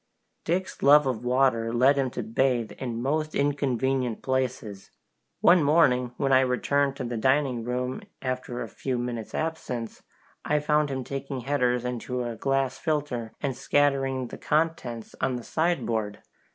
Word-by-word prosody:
Dick's 180 +3 -2
love 145 +1 +7
of 125 -3 -2
water 125 -2 +2
led 130 +4 +4
him 135 -2 0
to - - -5
bathe 120 0 0
in 120 -3 -3
most 155 +3 -1
inconvenient 135 -4 0
places. 130 -7 -2 0.5
One 175 0 +6
morning, 135 -5 +3
when 135 -1 0
I 130 - +7
returned 135 +2 +1
to 135 - -5
the 120 -1 -3
dining 130 0 +1
room 125 +2 -2 0.2
after 130 -1 -3
a - - -6
few 130 -2 -3
minutes' 120 -2 -4
absence, 130 -8 -4 0.4
I 150 - +1
found 150 0 +2
him 130 -1 -3
taking 135 0 -5
headers 125 -2 0
into 125 0 -3
a 120 -1 -4
glass 135 +1 0
filter 145 -8 -2
and 135 -3 -1
scattering 135 -3 +1
the - - -9
contents 150 -7 -1
on 130 -1 +1
the 120 - -5
sideboard. 115 -11 -1
130 Hz, 150 wpm, -26 LUFS, 120-140 Hz, 0.5 s, love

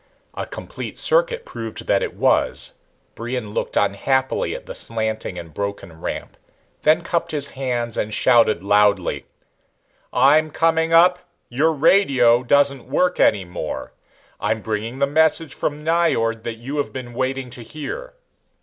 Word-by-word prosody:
A - - -5
complete - - -8
circuit - - +3
proved 115 -1 -7
that - - +2
it - - -3
was. - - +1 0.4
Brion 115 -2 -5
looked - - -2
unhappily 130 +7 0
at - - -9
the - - -7
slanting 110 -4 -2
and 85 -3 -9
broken 100 -5 -5
ramp, - - -5 0.4
then 160 +3 +3
cupped 170 0 -1
his 145 -2 -1
hands 120 -4 -3
and 105 - -2
shouted 110 -3 +3
loudly. 100 -2 +2 0.8
"I'm 150 +5 +4
coming 165 +1 +1
up. 180 +2 +5 0.3
Your 145 +7 +2
radio 135 -7 +4
doesn't 140 0 +2
work 180 0 +1
any 100 -3 +3
more. 90 -3 -6 0.5
I'm 110 0 -1
bringing 110 +4 -3
the 140 - +3
message 160 +2 +2
from 145 0 -3
Nyjord 150 -9 +1
that 115 - -3
you 130 +6 -6
have 145 - -1
been 125 -2 -7
waiting 130 0 -2
to 125 - -5
hear." 325 - -7
130 Hz, 145 wpm, -21 LUFS, 110-155 Hz, 0.8 s, up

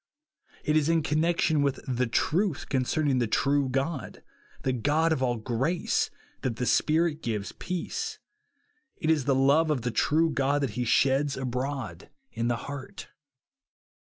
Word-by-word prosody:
It 150 - +1
is 155 0 +3
in 165 -1 +2
connection 160 0 +2
with 140 -2 0
the 125 -1 0
truth 160 - 0
concerning 135 +1 +1
the 120 - +1
true 140 +4 +1
God, 135 +3 -3 0.2
" - - -26
the 130 - +1
God 150 +7 +2
of 135 - -2
all 120 -2 +1
grace," 130 +10 0 0.3
that 120 -3 -1
the 125 - -2
Spirit 160 +5 +2
gives 105 -6 -3
peace. 445 - -4 0.8
It 155 - +1
is 150 -5 +1
the 135 -1 +3
love 140 +5 +4
of 140 -6 0
the 120 - -1
true 155 +8 +2
God 140 0 +1
that 130 - -1
he 125 +4 -2
sheds 135 +4 +2
abroad 125 - -4 0.2
in 115 - -2
the 120 -1 +1
heart. 145 +5 -8
140 Hz, 160 wpm, -27 LUFS, 125-155 Hz, 0.8 s, love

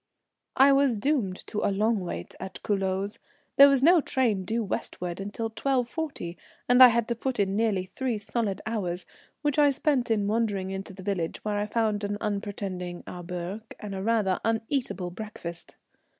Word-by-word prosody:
I 275 +1 +7
was 275 -4 +3
doomed 210 -6 -1
to 210 - -3
a - - +3
long 215 +2 +1
wait 170 - -5
at 190 +1 -7
Culoz. 195 0 -1 0.4
There 280 +1 +10
was 275 -1 +3
no 340 +2 +7
train 225 -10 +1
due 225 +4 -1
westward 180 -2 -4
till 225 +1 -3
12.40, 255 - -2 0.3
and 245 +1 +5
I 255 - +13
had 235 -1 +1
to - - +2
put 250 0 -3
in 195 -1 +1
nearly 210 -4 +1
three 235 +5 -2
solid 210 -1 -2
hours, 185 -6 -2 0.4
which 295 0 +1
I 290 -1 +6
spent 275 -3 +1
in 215 -3 +2
wandering 205 -3 0
into 195 +1 -5
the 190 - -10
village, 185 -3 -3
where 210 -1 0
I 205 - -1
found 215 -2 0
an 205 0 -2
unpretending 200 -4 -4
auberge 180 +3 -5 0.2
and 210 -2 -6
a 190 - -4
rather 210 -3 +1
uneatable 225 -5 -1
breakfast. 175 -5 -7
210 Hz, 170 wpm, -27 LUFS, 190-235 Hz, 0.4 s, I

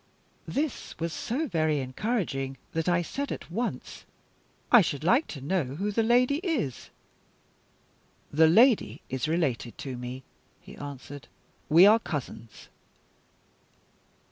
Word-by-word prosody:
This 290 0 -3
was 165 0 -3
so 280 - -2
very 155 - +1
encouraging 135 - -2
that 165 +2 -1
I 175 0 +2
said 280 - -4
at - - -7
once: 230 +6 -4 0.7
"I 240 - +9
should 150 -5 -2
like 240 - +3
to 140 - -8
know 170 +5 0
who 200 +6 -2
the 225 - +1
lady 245 +5 +3
is." 305 - -3 1.4
"The 160 +2 +6
lady 230 +8 +4
is 130 +2 -2
related 145 -8 -1
to 130 -2 -6
me," 125 +2 -7 0.4
he - - -13
answered. 145 0 -9 0.4
"We 170 +5 +8
are 215 +3 +7
cousins." 130 - -7
165 Hz, 125 wpm, -27 LUFS, 140-230 Hz, 1.4 s, I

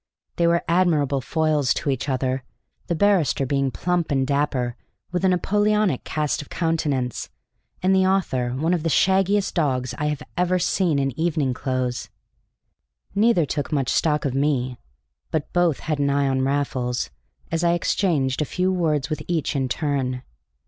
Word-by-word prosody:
They 170 - +3
were 170 0 +2
admirable 160 -6 +2
foils 155 -2 +1
to 140 - -1
each 135 +2 -2
other, 130 0 0 0.5
the 170 - 0
barrister 165 -8 +2
being 135 0 +1
plump 175 +3 -1
and 135 -2 +1
dapper, 135 -4 0 0.4
with 180 +1 -2
a 190 - +4
Napoleonic 205 -2 +1
cast 150 -1 -1
of 145 - -12
countenance, 150 - -1 0.5
and 190 +1 +4
the 190 0 +4
author 155 -11 +1
one 160 +7 0
of 175 - 0
the 165 - -1
shaggiest 195 +5 +2
dogs 130 -7 0
I 150 - 0
have 150 -2 -2
ever 180 +1 +2
seen 175 -3 +1
in 135 -1 +1
evening 155 -6 +1
clothes. 130 -1 -2 1.0
Neither 205 -5 +3
took 145 -1 -3
much 135 -4 0
stock 150 0 +1
of 135 - 0
me, 130 -3 0 0.5
but 155 -2 -3
both 175 -4 +2
had 155 -2 -2
an 140 0 +2
eye 140 0 +2
on 130 -1 +1
Raffles 130 - -1 0.4
as 165 +1 0
I 170 0 +4
exchanged 160 -6 +1
a - - +3
few 185 +5 0
words 155 -5 0
with 155 - -2
each 160 -4 -1
in 135 -2 0
turn. 130 -4 -1
150 Hz, 165 wpm, -23 LUFS, 135-175 Hz, 1.0 s, a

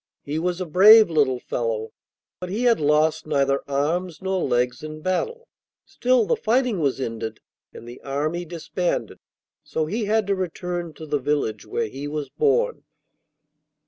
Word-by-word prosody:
He 150 +2 -3
was 180 +1 -1
a 185 - -2
brave 205 +4 +7
little 140 -5 +2
fellow, 115 -3 -3 0.5
but 180 - -6
he 215 +6 -2
had 235 -5 +4
lost 155 +1 +2
neither 140 -2 +1
arms 160 +5 -1
nor 190 -1 -1
legs 125 -1 0
in 155 0 -8
battle. 460 - -2 0.4
Still, 250 -2 +2
the - - +2
fighting 240 -2 +1
was 140 -4 0
ended 115 -3 -4 0.3
and 115 - -12
the 120 - -10
army 150 +5 -2
disbanded, 330 - -3 0.4
so 160 - -2
he 215 +7 -2
had 215 +1 +1
to 200 - +1
return 180 -2 -4
to 160 - -9
the 145 -1 -1
village 135 -6 -1
where - - -1
he 135 +6 -6
was 150 -1 -4
born. 475 +2 +1
160 Hz, 160 wpm, -23 LUFS, 140-200 Hz, 0.5 s, brave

